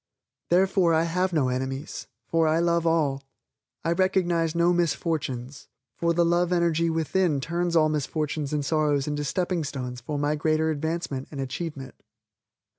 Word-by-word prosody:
Therefore 180 -1 +3
I 160 - +3
have 180 +3 0
no 150 -6 +1
enemies, 130 +2 -4 0.2
for 165 -1 +2
I 155 +1 +3
love 170 0 +2
all. 150 -5 +1 0.6
I 165 - +2
recognize 175 -3 +1
no 170 +1 +3
misfortunes, 150 -6 -2 0.3
for 170 0 0
the 170 0 +3
love 175 +1 +2
energy 170 -1 +2
within 165 -1 +1
turns 170 +4 -1
all 155 -2 +5
misfortunes 150 0 -2
and 150 -2 -1
sorrows 150 -3 +1
into 145 0 -2
stepping 175 +2 -1
stones 125 -3 -5
for 145 +5 -4
my 145 +1 +1
greater 155 +1 +1
advancement 155 -3 -3
and 145 - -8
achievement. 135 0 -5
160 Hz, 150 wpm, -26 LUFS, 145-170 Hz, 0.6 s, all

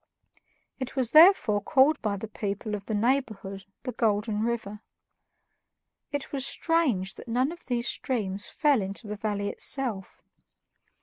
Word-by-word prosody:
It 260 0 -5
was 255 -4 +1
therefore 310 - +6
called 280 +6 +3
by 205 -2 -1
the 220 - -6
people 210 0 -4
of 200 -1 -5
the 220 - -1
neighborhood 210 -5 -1 0.2
the 255 - -3
Golden 215 -1 0
River. 220 -3 -3 1.3
It 285 -1 -4
was 275 -2 0
strange 265 - +1
that - - -12
none 250 +5 +1
of 345 - -12
these 240 -1 -1
streams 205 -6 -2
fell 290 -7 +2
into 195 +4 -3
the 210 0 -5
valley 205 -1 -2
itself. 230 -9 -2
225 Hz, 140 wpm, -27 LUFS, 205-265 Hz, 1.3 s, therefore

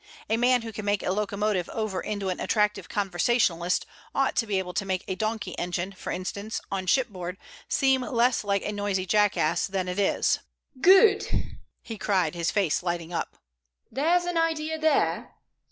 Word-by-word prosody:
A - - +4
man 245 +1 +3
who 225 -1 -7
can 215 - -6
make 205 -1 0
a - - 0
locomotive 205 -2 -1
over 215 -5 -2
into 205 -2 -3
an 185 - -3
attractive 210 -3 0
conversationalist 185 -2 +1 0.3
ought 270 0 +1
to 230 - +2
be 200 -2 0
able 180 -1 -3
to 200 - -1
make 190 -1 -2
a 190 - -1
donkey 215 -1 -3
engine, 180 +2 -2
for 195 - -7
instance, 200 +4 -4
on 190 -1 -3
shipboard, 190 -7 0 0.3
seem 265 -2 +3
less 245 -2 +1
like 200 -1 0
a - - -1
noisy 205 -2 -1
jackass 205 -5 +2
than 190 -1 -2
it 180 +2 -3
is." 200 - +2 0.4
"Good!" 395 +4 +5 0.3
he 225 -3 -7
cried, 185 -7 +1
his 170 -1 -1
face 195 -8 +1
lighting 175 -1 -3
up. - - -3 0.5
"There's 335 +8 +2
an 350 -1 0
idea 320 -1 -1
there. 315 -2 +1
205 Hz, 170 wpm, -26 LUFS, 185-240 Hz, 0.5 s, Good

